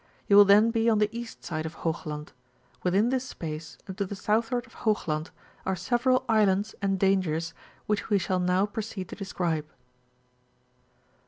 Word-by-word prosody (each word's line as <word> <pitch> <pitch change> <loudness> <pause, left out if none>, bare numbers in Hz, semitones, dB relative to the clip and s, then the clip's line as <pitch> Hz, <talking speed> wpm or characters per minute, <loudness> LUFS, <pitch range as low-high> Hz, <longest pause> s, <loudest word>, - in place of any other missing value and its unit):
you 200 - +5
will 205 0 +10
then 210 +3 +6
be 230 0 +2
on 220 - +3
the 210 +2 +1
east 235 -1 -7
side 155 -2 -3
of 160 0 -6
Hoog 165 -1 -3
land; 150 0 -6 0.5
withm 200 +7 +2
this 260 -1 0
space, 160 -9 -7
and 190 - -7
to - - +2
the 200 - -5
southward 225 +5 0
of 230 - -18
Hoogland, 160 -8 -1 0.3
are 190 - -1
several 240 +7 +1
islands 210 -2 +2
and 195 -1 +1
dangers, 170 -4 +1 0.3
which 210 +1 -1
we 205 - +4
^all 185 -1 0
now 180 +2 +3
proceed 205 -3 -5
to - - -7
describe. 170 -6 -2
195 Hz, 170 wpm, -27 LUFS, 175-220 Hz, 0.5 s, will